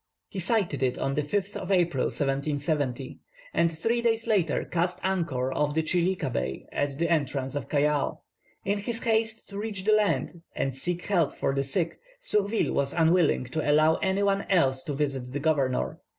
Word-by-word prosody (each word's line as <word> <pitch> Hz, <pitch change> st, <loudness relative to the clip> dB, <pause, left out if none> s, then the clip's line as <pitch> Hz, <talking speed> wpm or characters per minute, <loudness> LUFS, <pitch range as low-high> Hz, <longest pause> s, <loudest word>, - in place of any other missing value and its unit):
He 195 Hz, -, -5 dB
sighted 190 Hz, -, +1 dB
it 125 Hz, -1 st, +1 dB
on 135 Hz, -, -1 dB
the 150 Hz, -, +1 dB
5th 200 Hz, +7 st, -2 dB
of -, -, -4 dB
April, 175 Hz, -8 st, +2 dB
1770, 140 Hz, -2 st, -1 dB, 0.3 s
and 170 Hz, 0 st, +3 dB
three 225 Hz, +9 st, 0 dB
days 230 Hz, -1 st, +1 dB
later 195 Hz, -9 st, +1 dB
cast 175 Hz, +1 st, -1 dB
anchor 160 Hz, -9 st, 0 dB
off 145 Hz, +1 st, 0 dB
the 160 Hz, -, +2 dB
Chilica 175 Hz, -3 st, 0 dB
Bar 65 Hz, -, -3 dB
at 140 Hz, -1 st, -1 dB
the 170 Hz, +2 st, +1 dB
entrance 135 Hz, -5 st, 0 dB
of 145 Hz, -5 st, -4 dB
Callao. 145 Hz, 0 st, +1 dB, 0.4 s
In 200 Hz, +1 st, 0 dB
his 230 Hz, +3 st, -4 dB
haste 225 Hz, 0 st, 0 dB
to 200 Hz, 0 st, -6 dB
reach 205 Hz, -3 st, -4 dB
the 215 Hz, -, +3 dB
land, 205 Hz, -5 st, +1 dB
and 135 Hz, -, -1 dB
seek 175 Hz, +5 st, -2 dB
help 175 Hz, -7 st, +1 dB
for 135 Hz, -, 0 dB
his 135 Hz, 0 st, -1 dB
sick, 170 Hz, -1 st, 0 dB, 0.2 s
Surville 210 Hz, -, +1 dB
was 140 Hz, 0 st, +1 dB
unwilling 165 Hz, -3 st, +3 dB
to 140 Hz, +6 st, -3 dB
allow 155 Hz, +2 st, +5 dB
any 190 Hz, +1 st, 0 dB
one 200 Hz, 0 st, +2 dB
else 135 Hz, -9 st, +3 dB
to 145 Hz, -, -3 dB
visit 135 Hz, -3 st, -2 dB
the 145 Hz, -, -1 dB
governor. 140 Hz, -4 st, 0 dB
160 Hz, 180 wpm, -27 LUFS, 140-195 Hz, 0.4 s, allow